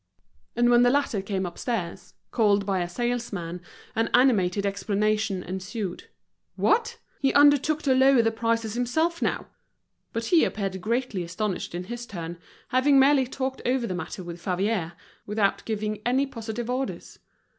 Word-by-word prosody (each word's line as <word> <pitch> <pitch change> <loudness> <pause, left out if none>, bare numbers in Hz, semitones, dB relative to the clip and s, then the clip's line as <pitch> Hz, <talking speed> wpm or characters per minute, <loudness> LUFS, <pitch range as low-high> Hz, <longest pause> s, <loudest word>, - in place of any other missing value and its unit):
And 240 0 +3
when 240 0 +6
the 245 - +5
latter 275 -6 +1
came 195 -1 -2
upstairs, 180 0 -4 0.2
called 205 -3 +3
by 195 -2 0
a 175 - -3
salesman, 200 -6 -3 0.3
an 225 +1 +1
animated 205 -7 +3
explanation 205 0 0
ensued. 190 +1 -5 0.5
What! 470 +1 +1 0.2
he 270 - +2
undertook 290 +1 +5
to 270 - +3
lower 265 -2 +5
the 225 - +2
prices 230 -1 -1
himself 315 +8 0
now! - - -1 0.7
But 230 0 -3
he 335 +6 +4
appeared 195 -2 -2
greatly 230 -2 -1
astonished 175 +1 -3
in 175 - -3
his 240 +4 -7
turn, 170 -3 -6 0.3
having 275 +2 +4
merely 270 -1 +5
talked 260 +1 -4
over 250 -1 +1
the 185 - -3
matter 180 +1 -5
with 170 0 -8
Favier, 185 -1 -1 0.3
without 205 -1 0
giving 215 -1 -3
any 260 +3 +2
positive 230 -2 -5
orders. 255 +2 -4
225 Hz, 150 wpm, -26 LUFS, 195-255 Hz, 0.7 s, when